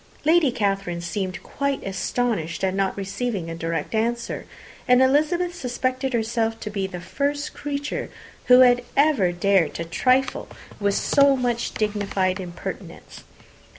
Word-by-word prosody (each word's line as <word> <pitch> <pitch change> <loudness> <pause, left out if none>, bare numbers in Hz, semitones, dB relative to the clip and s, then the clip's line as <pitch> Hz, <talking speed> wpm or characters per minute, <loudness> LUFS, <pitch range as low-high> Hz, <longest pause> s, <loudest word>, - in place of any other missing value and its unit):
Lady 320 -3 +4
Catherine 195 -5 -1
seemed 185 0 -4
quite 280 -1 -2
astonished 195 -3 -2
at 190 -1 +1
not 195 0 -1
receiving 195 -2 -3
a - - -5
direct 165 +4 -3
answer; 235 +2 -2 0.4
and 250 0 +6
Elizabeth 310 +7 +2
suspected 255 -3 -2
herself 225 -1 -1
to 210 - -5
be 195 -2 -2
the 180 -2 -7
first 285 +11 -2
creature 285 0 -4 0.4
who 250 0 +7
had 245 -1 +6 0.2
ever 275 -11 +4
dared 185 -1 +2
to 170 - -3
trifle 255 +10 +1 0.3
with 200 -1 +1
so 280 -1 +4
much 240 -2 -1
dignified 200 -3 0
impertinence. 175 -2 -8
225 Hz, 135 wpm, -23 LUFS, 190-260 Hz, 0.4 s, who